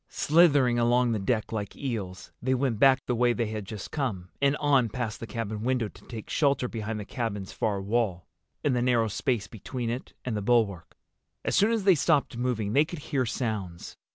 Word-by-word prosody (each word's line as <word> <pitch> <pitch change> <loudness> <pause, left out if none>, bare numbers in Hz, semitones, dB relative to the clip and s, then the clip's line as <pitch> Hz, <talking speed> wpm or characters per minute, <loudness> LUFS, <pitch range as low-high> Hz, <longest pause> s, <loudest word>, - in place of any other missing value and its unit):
Slithering 145 -7 +4
along 120 +1 +3
the 110 - 0
deck 110 +3 -1
like 105 -3 -4
eels, 105 -10 -5
they 130 +2 +1
went 125 -4 0
back 135 0 +5
the 125 - 0
way 120 0 +3
they 120 -1 -1
had 110 -1 -4
just 105 -1 -7
come, 105 - -3
and 140 +1 +3
on 135 -5 +3
past 115 -1 -4
the 115 - -6
cabin 110 -3 -4
window 125 -2 0
to - - -18
take 115 -3 -7
shelter 140 -4 +1
behind 110 -2 -4
the 105 - -6
cabin's 105 -5 -4
far 105 -3 -1
wall, 100 -3 -1 0.4
in 145 - +2
the 125 - +1
narrow 120 -3 +2
space 115 0 -1
between 115 +2 -5
it 125 +2 -6
and 125 -3 -2
the 105 - -2
bulwark. 100 -6 +1 0.5
As - - +1
soon 205 +4 +4
as 225 -3 0
they 190 -1 +6
stopped 150 -4 +2
moving 115 -4 -1
they 145 - +5
could 170 +2 -7 0.2
hear 130 -3 +2
sounds. 105 -8 -4
120 Hz, 205 wpm, -27 LUFS, 105-130 Hz, 0.5 s, they